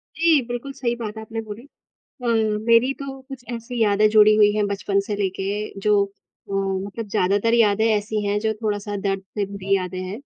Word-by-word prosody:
जी। 325 -2 +4
बिल्कुल, 245 +3 -5
सही 245 -3 -2
बात 225 -3 -6
है - - -5
आपने 225 +1 -5
बोली 220 +4 -9 0.6
अ, - - -1
मेरी 230 +3 +3
तो 270 -1 -6
कुछ 270 -3 -9
ऐसी 235 0 -4
यादें 210 0 +4
जुड़ी 215 0 +6
हुई 210 -1 +5
हैं 210 -1 +1
बचपन 200 0 0
से 210 - -2
लेके 200 +1 -3
जो 205 0 +4
अ, 200 0 -19
मतलब 195 +3 -2
ज़्यादातर 205 +3 +1
यादें 220 -2 +4
ऐसी 210 -1 0
हैं 205 +1 +1
जो 220 0 0
थोड़ा-सा 205 -1 -2
दर्द 195 -1 -1 0.2
से 205 - +1
भरी 195 0 -1
यादें 185 -1 -3
हैं। 185 +4 -6
210 Hz, 190 wpm, -22 LUFS, 200-230 Hz, 0.6 s, जुड़ी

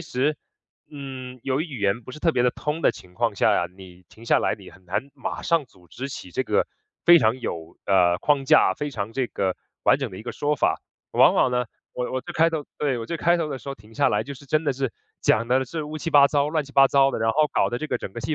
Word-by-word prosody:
实， 150 -1 -1 0.5
嗯， 130 -3 -8
由 135 +2 0
于 - - -1
语 135 -9 -8
言 100 +4 +1
不 130 - -10
是 155 - -9
特 165 - +3
别 125 - +2
地 125 - +4
通 150 +2 -3
的 - - +3
情 90 -1 -14
况 115 -1 0
下 - - +3
呀， 85 - +1
你 90 -1 -14
停 115 - -15
下 - - +4
来， - - 0
你 - - -13
很 95 +2 -19
难 100 +10 -3
马 135 - -5
上 165 -4 +2
组 90 -7 -23
织 135 +2 -6
起 95 -9 -8
这 - - -1
个 - - +2 0.4
非 175 0 +8
常 115 +2 +1
有， 80 -6 -6
呃， 90 -3 +4
框 145 -2 +1
架， 115 - +5
非 150 - -3
常 110 -2 -4
这 130 0 -1
个 95 -5 -2 0.3
完 130 - +4
整 135 -4 -2
的 95 - -9
一 - - -8
个 120 - -5
说 145 +1 0
法。 - - +1 0.3
往 - - +5
往 - - +3
呢， 125 0 0 0.3
我 125 0 -3
我 130 - -1
最 - - -8
开 165 +1 +4
头 160 -3 -3
对， 140 -4 0
我 115 - -5
最 170 - -3
开 170 +1 +3
头 165 -2 -2
的 135 - -4
时 140 - -11
候 135 - -3
停 105 0 -19
下 - - +3
来， 105 - +1
就 140 - -7
是 140 +2 -15
真 155 +3 +1
的 145 - +1
是 135 -2 -2 0.3
讲 115 +2 +2
得 130 +2 +2
是 160 +5 -5
乌 155 +1 -6
七 165 - -4
八 145 -2 +7
糟、 145 0 +1
乱 155 -1 0
七 140 - -15
八 135 -1 +7
糟 135 0 +4
的， - - -3
然 110 0 +2
后 155 +3 +3
搞 - - +2
得 120 - -3
这 155 - -4
个 - - -1
整 - - -6
个 - - -5
气 155 - -2
130 Hz, 305 characters per minute, -24 LUFS, 110-150 Hz, 0.5 s, 非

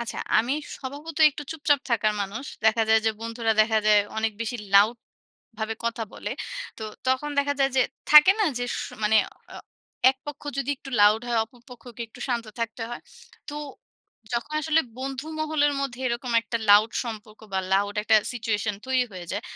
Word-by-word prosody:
আচ্ছা, 235 - -5 0.2
আমি 240 +4 +1 0.2
স্বভাবতই 295 +4 +1
একটু 295 +1 -8
চুপচাপ 290 -3 +2
থাকার 215 -2 +2
মানুষ। 205 +7 -4 0.2
দেখা 220 +1 +4
যায় 220 0 +5
যে, - - +5
বন্ধুরা 230 0 -1
দেখা 220 0 +3
যায় 210 -1 +6 0.2
অনেক 220 0 0
বেশি 230 +2 -2 0.2
লাউড 210 +4 +6 0.6
ভাবে 220 0 -2
কথা 235 0 -1
বলে। - - -6 0.5
তো - - -7 0.3
তখন 260 +3 +1
দেখা 285 0 +2
যায় 270 0 +3
যে, 260 - +6 0.3
থাকে 300 +4 +10
না? 425 - +4
যে 245 - -1
স - - -4 0.2
মানে 210 +1 +4 0.4
অ - - -8 0.5
এক 265 - -8
পক্ষ 295 - -7 0.2
যদি 275 +1 -1
একটু 270 - -11
লাউড 210 +2 +6
হয়, 235 - +1
অপর 240 +2 -22
পক্ষকে 245 -1 -12
একটু 235 - -15
শান্ত 235 -2 -1
থাকতে 230 0 -3
হয়। 240 - -7 0.5
তো 295 - -6 0.8
যখন 240 +6 -3
আসলে 315 +2 +3 0.2
বন্ধু 270 +2 -5
মহলের 305 -2 +2
মধ্যে 260 -2 -4
এরকম 235 +1 -3
একটা 230 - -3
লাউড 210 +2 +6
সম্পর্ক, 215 -2 -8
বা 190 - +1
লাউড 200 +1 +2
একটা 220 +1 +5 0.2
সিচুয়েশন 220 -3 -1
তৈরি 260 -1 +2
হয়ে 180 -2 -8
যায়। 205 - -3
235 Hz, 180 wpm, -25 LUFS, 220-270 Hz, 0.8 s, থাকে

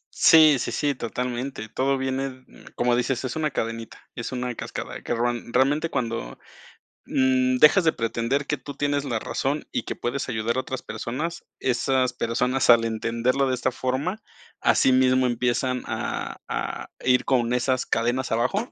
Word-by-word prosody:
Sí, 155 -4 +7
sí, - - -2
sí, 145 -1 0
totalmente, 125 0 -4
todo 135 +4 0
viene, 130 +1 -1
mm, 130 -1 -16
como 120 0 +2
dices, 125 +1 0
es 130 - -4
una 155 -1 0
cadenita, 115 -2 -4 0.2
es 120 - -5
una 125 -1 -3
cascada, - - -6
que 120 - -2
ron 120 0 -2
realmente, 145 +5 +2
cuando, 115 -5 -3 0.7
mm, 130 -1 +2
dejas 150 +8 +6
de 160 - +3
pretender 115 +5 -1
que 150 - 0
tú 140 +2 -9
tienes 145 -1 0
la 120 -5 -1
razón 140 +6 -2
y - - -2
que - - -5
puedes 135 +3 -3
ayudar 115 +1 -1
a 130 - +2
otras 130 0 -5
personas, 130 +10 -5
esas 130 0 +1
personas 125 +2 +2
al 115 -1 +5
entenderlo 115 +4 0
de 130 - 0
esta 130 +1 0
forma, 140 - -2 0.4
asimismo 130 0 +4
empiezan 125 +1 0
a - - -4
a - - -4 0.2
ir 125 0 +4
con 120 -2 +1
esas 125 +1 +1
cadenas 120 +2 0
abajo 125 - 0
130 Hz, 165 wpm, -24 LUFS, 120-135 Hz, 0.7 s, Sí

